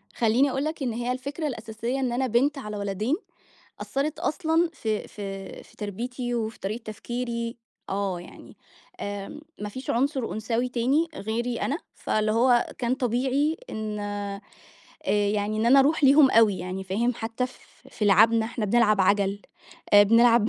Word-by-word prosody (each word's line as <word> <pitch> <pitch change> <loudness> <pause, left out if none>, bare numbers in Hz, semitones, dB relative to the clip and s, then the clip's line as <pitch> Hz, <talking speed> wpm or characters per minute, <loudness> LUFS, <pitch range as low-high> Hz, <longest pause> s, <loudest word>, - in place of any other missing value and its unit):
خليني 240 +5 +3
أقول 270 +2 -1
لك 310 -1 -3
إن 245 -3 -1
هي 240 +2 -2
الفكرة 280 +5 -3
الأساسية 230 +1 -4
إن 255 -2 0
أنا 260 +2 0
بنت 270 +5 +2
على 210 -5 -5
ولدين، 205 +7 -1 0.7
أثرت 280 +3 -2
أصلًا 325 +1 +1
في 220 -7 -2
في 195 -2 -7
في - - -21
تربيتي 240 +4 -4
وفي 220 -1 -3
طريقة 215 +4 -4
تفكيري. 235 +1 -4 0.3
آه، 195 -2 -1
يعني 175 - -14 0.4
آمم، 205 +7 -5 0.2
ما 210 - -3
فيش 260 +5 -8
عُنصر 265 0 0
أنثوي 230 +3 -1
تاني 260 +7 +1
غيري 235 +1 -2
أنا، 285 - 0 0.2
فاللي 215 0 0
هو 240 +1 +4
كان 245 +1 0
طبيعي 265 +5 0
إن 215 -1 -4
آآ، 205 -1 -4 0.7
يعني 205 0 +1
إن 220 - +1
أنا 270 +3 +7
أروح 295 +2 +3
ليهم 275 0 +7
أوي 215 -4 +5
يعني، 185 +2 -5
فاهم، 230 +6 0
حتى 225 +3 -2
ف 255 - -16 0.3
في 215 - -3
لِعَبْنَا، 220 +3 +5
إحنا 230 -1 -3
بنلعب 215 -1 +3
عَجَل، 200 +1 +2 0.5
آآ، 205 - +10
بنلعب 230 +1 +5
230 Hz, 160 wpm, -26 LUFS, 210-255 Hz, 0.7 s, آآ